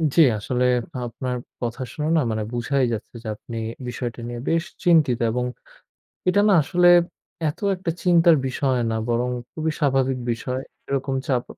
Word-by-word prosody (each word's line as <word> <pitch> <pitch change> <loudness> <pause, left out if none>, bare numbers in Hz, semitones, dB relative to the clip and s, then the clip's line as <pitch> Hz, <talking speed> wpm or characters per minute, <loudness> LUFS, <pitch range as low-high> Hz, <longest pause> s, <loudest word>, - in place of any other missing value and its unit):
জি, 165 - +7 0.2
আসলে 125 +4 -1 0.4
আপনার 125 +2 -4 0.2
কথা 120 +1 -3
শুনে 150 0 -2
না - - +4
মানে 110 -1 -1
বুঝাই 130 +3 0
যাচ্ছে 115 +2 -6
যে - - -7
আপনি 115 +2 -8 0.3
বিষয়টা 120 0 -4
নিয়ে 120 0 -5
বেশ 165 +1 +1 0.2
চিন্তিত 155 -9 +4
এবং 125 +1 -1 0.8
এটা 205 +2 +4
না 200 - +5
আসলে 175 +4 +3 0.6
এত 150 - -4 0.2
একটা 180 -2 -3
চিন্তার 170 -2 +5
বিষয় 130 0 0
না। 110 - 0
বরং 120 +1 +1 0.2
খুবই 160 0 -1
স্বাভাবিক 135 -3 +2
বিষয়। 125 +3 -3 0.3
এরকম 135 0 -1
চাপ 125 -4 +1
130 Hz, 155 wpm, -23 LUFS, 120-160 Hz, 0.8 s, জি